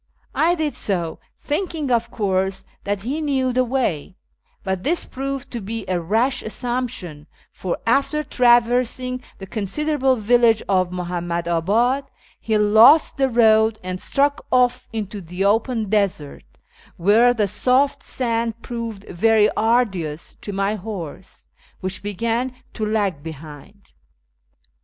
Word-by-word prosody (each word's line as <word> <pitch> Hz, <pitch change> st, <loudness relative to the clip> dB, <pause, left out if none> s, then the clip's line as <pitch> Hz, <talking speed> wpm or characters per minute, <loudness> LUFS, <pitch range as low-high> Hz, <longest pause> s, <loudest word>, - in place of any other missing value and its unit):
I 340 Hz, +2 st, +2 dB
did 310 Hz, -3 st, -1 dB
so, 175 Hz, -5 st, -2 dB, 0.2 s
thinking, 305 Hz, -3 st, -3 dB
of 235 Hz, -1 st, +1 dB
course, 190 Hz, -2 st, -1 dB, 0.2 s
that 205 Hz, -1 st, -2 dB
he 270 Hz, +9 st, -3 dB
knew 265 Hz, -4 st, 0 dB
the 255 Hz, +1 st, +3 dB
way; 235 Hz, -, -2 dB, 0.5 s
but 190 Hz, -1 st, -2 dB
this 330 Hz, -, 0 dB
proved 275 Hz, +1 st, -5 dB
to 235 Hz, -, -5 dB
be 220 Hz, +1 st, -5 dB
a 180 Hz, -1 st, -1 dB
rash 230 Hz, +9 st, +1 dB
assumption, 220 Hz, -10 st, -4 dB, 0.2 s
for, 185 Hz, -, -4 dB
after 280 Hz, +6 st, +1 dB
traversing 250 Hz, 0 st, +2 dB, 0.2 s
the 195 Hz, -, -8 dB
considerable 260 Hz, +7 st, 0 dB
village 230 Hz, 0 st, +3 dB
of 185 Hz, -2 st, +2 dB
Muhammadiibad, 175 Hz, +8 st, 0 dB, 0.3 s
he 220 Hz, -1 st, 0 dB
lost 220 Hz, +9 st, +6 dB
the 270 Hz, -1 st, +2 dB
road 220 Hz, -2 st, +4 dB
and 185 Hz, 0 st, -5 dB
struck 285 Hz, 0 st, +1 dB
off 250 Hz, 0 st, +2 dB
into 210 Hz, -3 st, -5 dB
the 180 Hz, +3 st, -3 dB
open 225 Hz, +2 st, +1 dB
desert, 195 Hz, -8 st, -1 dB, 0.5 s
where 215 Hz, +7 st, +5 dB
the 220 Hz, -4 st, 0 dB
soft 260 Hz, +7 st, +2 dB
sand 230 Hz, -2 st, -2 dB
proved 230 Hz, -4 st, -5 dB
very 215 Hz, +3 st, +3 dB
arduous 195 Hz, -9 st, 0 dB
to 205 Hz, -, -6 dB
my 195 Hz, +1 st, 0 dB
horse, 190 Hz, -5 st, -7 dB, 0.3 s
which 185 Hz, +1 st, -4 dB
began 230 Hz, +5 st, -2 dB, 0.2 s
to 220 Hz, -, -5 dB
lag 205 Hz, -7 st, 0 dB
behind. 160 Hz, +5 st, -11 dB
220 Hz, 130 wpm, -21 LUFS, 190-250 Hz, 0.5 s, lost